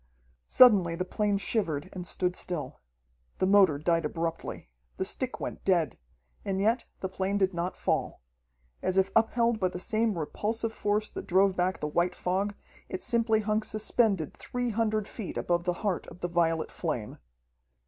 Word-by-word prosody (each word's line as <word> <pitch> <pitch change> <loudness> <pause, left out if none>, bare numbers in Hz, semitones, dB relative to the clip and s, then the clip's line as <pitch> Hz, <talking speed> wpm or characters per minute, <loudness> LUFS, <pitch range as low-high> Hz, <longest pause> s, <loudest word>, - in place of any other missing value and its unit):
Suddenly 195 -9 +6
the 180 +2 -2
plane 205 +1 0
shivered 185 -7 -1
and 180 -2 -6
stood 180 0 -1
still. 150 -7 -4 0.6
The - - +1
motor 190 -6 +5
died 165 +2 +1
abruptly. 165 - -4 0.3
The 190 - -1
stick 255 +5 -1
went - - -5
dead. 170 - +1 0.4
And 195 -1 -1
yet 225 +5 +2 0.2
the 190 - -1
plane 190 +1 -1
did 190 -1 +2
not 175 +2 -3
fall. - - -1 0.6
As 185 - -1
if 190 0 +3
upheld 230 0 +3
by 185 - +2
the 180 - -5
same 220 -1 0
repulsive 220 +8 -2
force 210 0 -1
that - - -7
drove 190 +1 +4
back 185 +1 0
the 150 - -1
white 175 +4 +1
fog, 195 +3 -1 0.3
it 185 - -4
simply 230 -2 +2
hung 215 +1 +1
suspended 215 - +1
three 245 -1 -3
hundred 215 -1 0
feet 215 -6 -6
above 175 0 0
the 180 - +1
heart 190 -4 -1
of 180 - -12
the 175 - 0
violet 165 -2 +1
flame. 125 -11 -4
190 Hz, 170 wpm, -29 LUFS, 175-215 Hz, 0.6 s, Suddenly